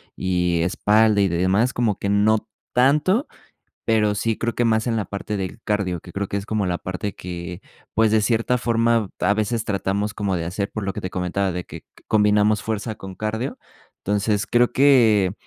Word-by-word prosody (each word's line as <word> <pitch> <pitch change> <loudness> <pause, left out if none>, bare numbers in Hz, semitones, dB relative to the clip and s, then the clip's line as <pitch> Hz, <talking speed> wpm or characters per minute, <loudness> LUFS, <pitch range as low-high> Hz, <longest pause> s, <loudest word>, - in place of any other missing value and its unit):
y 90 -2 0
espalda 105 +4 +3
y 100 - +4
demás, 95 +8 +1
como 115 -5 0
que - - -3
no 105 +2 +2 0.2
tanto, 150 - +3 0.6
pero 105 -2 +2
sí 110 +2 -1
creo 120 -1 -2
que 120 - +1
más 110 0 +2
en 115 -2 0
la 110 - -1
parte 105 +1 -5
del 95 -2 -5
cardio, 95 -5 -1
que 85 - -13
creo 100 +1 -3
que 100 - -2
es 100 - -7
como 110 -2 -1
la 90 -1 -1
parte 95 +2 -4
que 90 0 -7 0.3
pues, 110 0 +3
de 110 0 +3
cierta 115 +3 +1
forma, 115 -3 +1
a 100 - +3
veces 110 +2 -1
tratamos 100 +1 -1
como 100 -3 -1
de 85 -1 -3
hacer, 100 +3 -3
por 110 - -5
lo 95 -1 -3
que - - -5
te 95 - -4
comentaba, 90 +2 -1
de 90 0 -4
que - - -11 0.2
combinamos 105 0 +3
fuerza 110 0 -3
con 95 -2 -9
cardio. 110 +6 -3 0.5
Entonces, 105 +1 0
creo 120 0 +3
que 115 -9 +4
105 Hz, 195 wpm, -22 LUFS, 95-110 Hz, 0.6 s, y